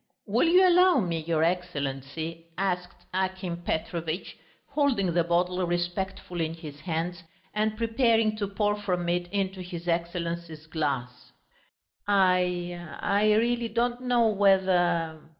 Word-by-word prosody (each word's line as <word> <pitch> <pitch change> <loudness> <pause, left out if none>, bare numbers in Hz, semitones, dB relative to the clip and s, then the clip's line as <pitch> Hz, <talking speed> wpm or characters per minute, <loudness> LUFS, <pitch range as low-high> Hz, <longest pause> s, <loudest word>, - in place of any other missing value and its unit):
"Will - - +2
you 365 +2 +6
allow 360 0 +6
me, 170 -6 -1
your 160 0 0
Excellency?" 165 -1 -3
asked 180 -2 -2
Akim 185 -2 -2
Petrovitch, 165 0 -3 0.3
holding 270 - +1
the 170 0 +3
bottle 180 +2 +1
respectfully 175 -1 -2
in 160 - -7
his 150 -3 -10
hands 170 +2 -3 0.3
and 215 0 0
preparing 225 -1 +2
to 205 -2 -1
pour 205 +1 0
from 180 -4 -1
it 175 0 -1
into 190 -2 -2
his 175 -1 -7
Excellency's 170 -2 -3
glass. 140 -6 -3 0.7
"I... 180 -3 +2 0.2
I 210 +1 +3
really 235 +1 +1
don't 240 +2 0
know, 245 -2 +3
whether...." 180 -5 +2
180 Hz, 125 wpm, -27 LUFS, 170-205 Hz, 0.7 s, you